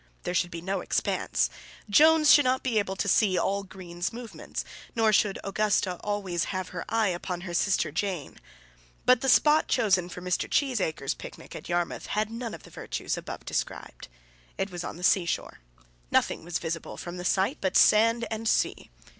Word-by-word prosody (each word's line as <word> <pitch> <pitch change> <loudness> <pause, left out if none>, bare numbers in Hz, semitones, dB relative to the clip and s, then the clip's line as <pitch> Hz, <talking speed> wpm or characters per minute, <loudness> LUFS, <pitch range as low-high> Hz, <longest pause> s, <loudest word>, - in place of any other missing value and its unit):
There 180 - -2
should 175 -1 +1
be 170 -1 -7
no 190 0 -2
expanse. - - 0 0.4
Jones 305 +7 +6
should 290 - +7
not 255 0 +1
be 235 -4 +1
able 195 -2 -2
to 200 - -2
see 195 -1 +3
all 200 +1 0
Greene's 180 -2 -6
movements, 235 -1 -7 0.3
nor 220 -2 +3
should 200 -1 +3
Augusta 195 -2 0
always 195 -4 -1
have 185 -1 -4
her 175 -1 -5
eye 225 -2 +2
upon 175 0 -4
her 175 -1 -6
sister 170 -3 +1
Jane. 180 -1 -3 0.7
But 250 0 +5
the 270 - +1
spot 300 +5 +5
chosen 190 -7 +2
for 180 - -8
Mr. 180 0 -1
Cheesacre's 190 - 0
picnic - - -11
at - - -9
Yarmouth 175 0 -1
had 215 +1 -1
none 230 0 -5
of - - -14
the - - -15
virtues - - -4
above - - -7
described. - - -4 0.5
It 195 0 -2
was 175 -1 -5
on - - -6
the 175 - -10
seashore. 180 -2 +1 0.5
Nothing - - +1
was 175 0 -2
visible 165 0 -5
from 175 +1 -7
the 180 - -5
site 190 +1 +1
but 190 -1 +2
sand 230 +2 +5
and 220 0 -1
sea. - - 0
195 Hz, 180 wpm, -27 LUFS, 175-225 Hz, 0.7 s, should